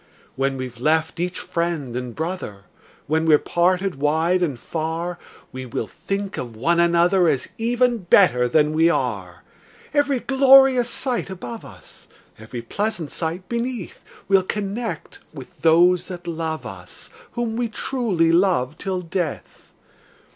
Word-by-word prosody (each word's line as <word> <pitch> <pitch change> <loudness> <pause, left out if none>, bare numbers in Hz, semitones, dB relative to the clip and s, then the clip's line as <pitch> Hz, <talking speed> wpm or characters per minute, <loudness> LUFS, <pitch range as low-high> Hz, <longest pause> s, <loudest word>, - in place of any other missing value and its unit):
When 135 0 -1
we've 125 -2 -6
left 160 +4 +1
each 180 +1 -2
friend 165 -7 -3
and 125 -2 -5
brother, 160 - -5 0.4
When 160 +2 0
we're 155 -2 +7
parted 180 0 0
wide 160 +5 +2
and 145 -9 -1
far, 165 +4 -4 0.3
We 130 0 -7
will 115 - -3
think 195 - -4
of 120 -3 -6
one 170 +10 +1
another, 170 +1 +4
As 140 -5 0
even 240 +1 +1
better 175 -9 +4
than 150 +4 +2
we 165 +2 +4
are. - - -2 0.5
Every 285 -3 +2
glorious 265 -2 +5
sight 250 -5 -2
above 125 -11 -7
us, - - -14 0.3
Every 115 +2 -7
pleasant 180 - -3
sight 170 +3 -4
beneath, 235 -4 -4 0.2
We'll 195 -1 +5
connect 210 +4 -4 0.2
with - - -12
those 175 +2 +4
that 180 -2 -8
love 160 -1 -4
us, - - -10 0.2
Whom 235 -2 -2
we 235 0 -1
truly 210 -9 0
love 165 -6 +2
till 190 -2 -2
death! 175 -2 -5
170 Hz, 140 wpm, -22 LUFS, 155-200 Hz, 0.5 s, we're